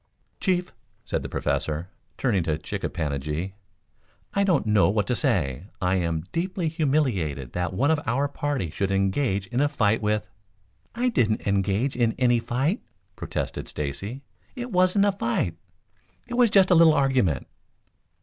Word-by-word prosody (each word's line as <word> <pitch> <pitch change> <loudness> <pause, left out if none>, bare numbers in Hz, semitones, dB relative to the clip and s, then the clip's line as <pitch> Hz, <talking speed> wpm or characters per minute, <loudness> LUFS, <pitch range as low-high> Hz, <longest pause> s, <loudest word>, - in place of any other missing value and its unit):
"Chief," 180 -2 0 0.3
said - - -2
the - - -6
Professor, 80 +4 -2 0.3
turning 110 -8 +1
to 80 -2 -1
Chick - - -6
a - - 0
pan 80 -3 -2
a 70 - -2
gi, 75 +7 -4 0.8
"I 200 - +2
don't 180 - +2
know 105 -2 +4
what 105 0 +1
to 125 - 0
say. 85 - 0
I 90 -1 +1
am 85 -3 -1
deeply 175 0 -1
humiliated 125 - 0
that 90 +1 -1
one 135 +11 +2
of 160 - +2
our 135 +5 +1
party 140 - -2
should 100 +4 -1
engage 95 +2 +1
in 120 +7 -1
a 145 - +3
fight 110 -7 +1
with 105 0 0 0.4
" - - -44 0.3
"I 250 +2 +1
didn't 110 - +1
engage 100 +6 +1
in 115 -2 +1
any 120 -2 +3
fight," 135 - -1 0.3
protested - - -4
Stacy. 100 - -5 0.3
"It 245 -1 -5
wasn't 185 +2 +4
a 205 - +4
fight, 115 - -1 0.7
it 245 - -8
was 240 -1 +4
just 195 -2 +5
a - - +8
little 165 -2 +7
argument." 130 - +2
115 Hz, 170 wpm, -25 LUFS, 95-155 Hz, 0.8 s, a